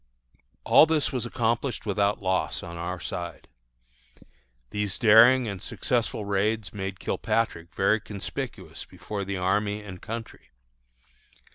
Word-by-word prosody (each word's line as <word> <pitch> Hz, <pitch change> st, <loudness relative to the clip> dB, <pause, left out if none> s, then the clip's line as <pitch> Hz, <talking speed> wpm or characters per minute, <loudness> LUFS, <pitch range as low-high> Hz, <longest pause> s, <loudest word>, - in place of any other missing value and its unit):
All 160 Hz, -, +7 dB
this 155 Hz, -2 st, +1 dB
was 125 Hz, -2 st, -2 dB
accomplished 120 Hz, +1 st, -1 dB
without 100 Hz, 0 st, +1 dB
loss 95 Hz, 0 st, 0 dB
on 85 Hz, -, -7 dB
our 85 Hz, +2 st, -4 dB
side. 85 Hz, -1 st, -6 dB, 1.2 s
These 105 Hz, -1 st, -1 dB
daring 120 Hz, +2 st, +7 dB
and 100 Hz, -4 st, -5 dB
successful 105 Hz, -, -1 dB
raids 100 Hz, +1 st, 0 dB
made 95 Hz, -2 st, -4 dB
Kilpatrick 85 Hz, -7 st, -1 dB
very 110 Hz, +3 st, +3 dB
conspicuous 105 Hz, -2 st, -6 dB
before 105 Hz, -2 st, -6 dB
the 100 Hz, 0 st, -3 dB
army 105 Hz, +3 st, 0 dB
and 95 Hz, -3 st, -9 dB
country. 115 Hz, 0 st, -7 dB
105 Hz, 120 wpm, -26 LUFS, 95-115 Hz, 1.2 s, All